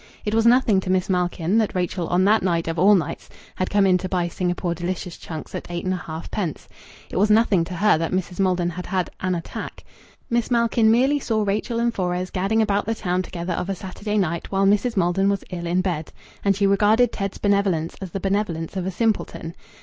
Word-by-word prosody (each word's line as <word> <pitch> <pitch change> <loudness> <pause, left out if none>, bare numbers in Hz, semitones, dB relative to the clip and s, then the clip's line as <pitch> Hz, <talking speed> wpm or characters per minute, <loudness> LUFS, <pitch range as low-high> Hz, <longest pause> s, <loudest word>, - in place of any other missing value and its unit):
It 210 - -1
was 225 +1 +3
nothing 235 -5 +4
to 185 - -5
Miss 185 0 +1
Malkin 180 +2 +1
that 215 -3 0
Rachel 180 -1 -1
on 180 +2 +2
that 215 +2 +4
night 170 -3 0
of 165 0 -2
all 200 +4 +6
nights 165 -6 -3 0.3
had 185 - -1
come 205 -1 +3
in 185 -1 +4
to 185 - -4
buy 180 -2 0
Singapore 175 0 -2
Delicious 175 0 -4
Chunks 160 -2 -8
at - - -6
8 175 0 -4
1/2d. 175 -1 -4 0.4
It - - -3
was 205 +3 +3
nothing 210 -5 +4
to 180 - -6
her 205 -2 +3
that 165 - -2
Mrs. 185 0 -2
Maldon 180 -2 +1
had 180 +1 -7
had 185 -2 -1
"an 185 -1 0
attack." 170 - -7 0.4
Miss 235 -1 0
Malkin 235 -2 +3
merely 265 +6 +3
saw 220 -5 0
Rachel 210 +4 -1
and 235 0 +1
Fores 180 -1 -2
gadding 205 +4 +1
about 205 -1 0
the 225 - 0
town 180 -4 -1
together 175 -1 -4
of 180 - -3
a 195 - -1
Saturday 205 +3 -4
night 170 -4 -1
while 195 0 +2
Mrs. 210 +3 +2
Maldon 190 +2 +2
was 200 -1 -1
ill 175 -1 -4
in 180 +2 +1
bed. 170 -5 -3 0.3
And 200 -1 +3
she 200 +1 +1
regarded 210 +5 +4
Ted's 195 -1 -4
benevolence 200 -5 +1
as 190 - -5
the 195 - -4
benevolence 190 -4 -2
of 185 -1 -2
a - - -1
simpleton. 200 -5 -1
190 Hz, 215 wpm, -23 LUFS, 175-210 Hz, 0.4 s, all